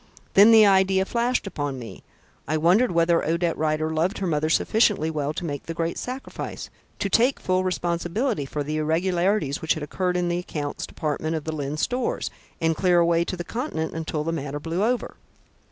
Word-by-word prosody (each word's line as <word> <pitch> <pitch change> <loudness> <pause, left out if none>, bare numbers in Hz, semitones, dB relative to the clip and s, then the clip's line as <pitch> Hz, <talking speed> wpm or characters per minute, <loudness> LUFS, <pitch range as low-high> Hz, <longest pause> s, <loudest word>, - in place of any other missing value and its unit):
Then 200 +3 +8
the 220 -1 +8
idea 190 -1 +4
flashed 240 +3 0
upon 145 -8 -3
me. 115 -6 -9 0.4
I 155 +2 +1
wondered 185 +10 +3
whether 170 0 +3
Odette 170 +1 0
Rider 155 0 0
loved 170 +6 0
her 195 - -2
mother 155 -2 0
sufficiently 200 -3 +2
well 150 -2 -2
to 175 - -4
make 145 -3 -5
the 165 - -4
great 165 0 -1
sacrifice, 255 +2 -6 0.3
to - - -1
take 240 +7 +3
full 185 0 0
responsibility 175 - -1
for 145 +1 -3
the 155 +2 -3
irregularities 170 0 0
which 160 - +1
had 155 - -5
occurred 180 +4 -1
in 175 0 0
the 175 0 0
accounts' 150 -5 -4
department 155 +1 -2
of 155 - -4
Lyne's 150 -1 -3
Stores, 250 0 -1 0.3
and 165 0 +1
clear 180 +1 +3
away 170 0 +3
to 185 - -4
the 175 - -4
Continent 200 - -3
until 160 -2 -3
the 165 - -2
matter 145 -2 -4
blew 165 +5 -2
over. 245 +2 -1
170 Hz, 185 wpm, -24 LUFS, 155-190 Hz, 0.4 s, Then